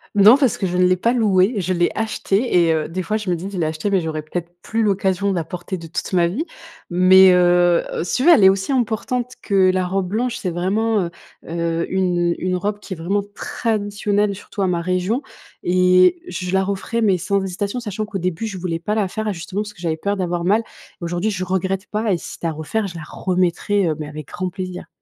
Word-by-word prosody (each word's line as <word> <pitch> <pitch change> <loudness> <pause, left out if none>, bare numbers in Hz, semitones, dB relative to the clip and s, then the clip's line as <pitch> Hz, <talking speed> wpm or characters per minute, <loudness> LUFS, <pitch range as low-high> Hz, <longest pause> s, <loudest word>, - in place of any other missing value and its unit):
Non, 210 +5 +8
parce 270 -5 +2
que 195 - -1
je 180 0 -2
ne 180 - +4
l'ai 185 0 +4
pas 230 +6 +1
louée. 210 -2 +3
Je 185 -1 0
l'ai 175 -1 +2
achetée 215 -3 +1
et 165 - +3
heu, 155 -1 -1
des 185 +3 -4
fois 215 +5 -1
je 210 -3 -5
me 175 - +2
dis: 180 +4 -6
«Je 195 - -5
l'ai 170 - 0
achetée, 155 +5 -2
mais 195 -2 +2
j'aurais 160 -1 -3
peut-être 170 +3 -5
plus 225 0 -2
l'occasion, 195 -1 +1
de - - -1
la 170 - -1
porter, 180 +3 -6
de 165 -1 -9
toute 165 - -4
ma 175 -2 +4
vie.» 235 - -2 0.4
Mais, 185 +1 +7
heu, 175 -1 +4
heu, - - -2
si 175 - -1
tu 255 - 0
veux, 345 - +7
elle 260 - +5
est 190 - +9
aussi 195 +6 0
importante 245 0 -1
que 195 -2 +3
la 185 0 0
robe 190 +1 -1
blanche. 235 +5 -1
C'est 185 - -3
vraiment, 205 +5 0
heu, - - -4 0.4
heu, 170 0 -1
une 175 -2 +1
une 185 0 -1
robe 205 +3 -2
qui 205 - -7
est - - -5
vraiment 195 +5 -1
traditionnelle 205 -2 -1
surtout 200 +1 -7
à 190 - +2
ma 175 -2 0
région 185 +8 0 0.4
et 185 - +4
je 180 - -4
la 190 0 +3
referais, 200 +4 -2
mais 200 -4 +3
sans 200 +3 0
hésitation. 200 +5 -3
Sachant 215 -2 -4
qu'au 210 -2 -5
début, 185 +4 -2
je 200 -3 -6
voulais 170 -2 -3
pas 210 +5 -2
la 210 -3 +1
faire, 215 +3 -3
justement, 185 +3 -4
parce 210 0 -7
que 175 - -16
j'avais 165 -2 -1
peur 200 +5 -1
d'avoir 175 -2 -2
mal. 210 +5 +3 0.4
Aujourd'hui, 175 +5 -1
je 185 -2 -3
regrette 190 +2 -2
pas 215 0 -1
et - - +1
si - - -9
c'était 170 - -4
à - - 0
refaire, 160 +8 -2
je 175 - -9
la 165 - -7
remettrais, 185 +2 0
heu, 155 - 0
mais 150 - -5
avec 150 -1 -8
grand 185 0 -3
plaisir. 185 -1 -6
185 Hz, 240 wpm, -20 LUFS, 175-205 Hz, 0.4 s, est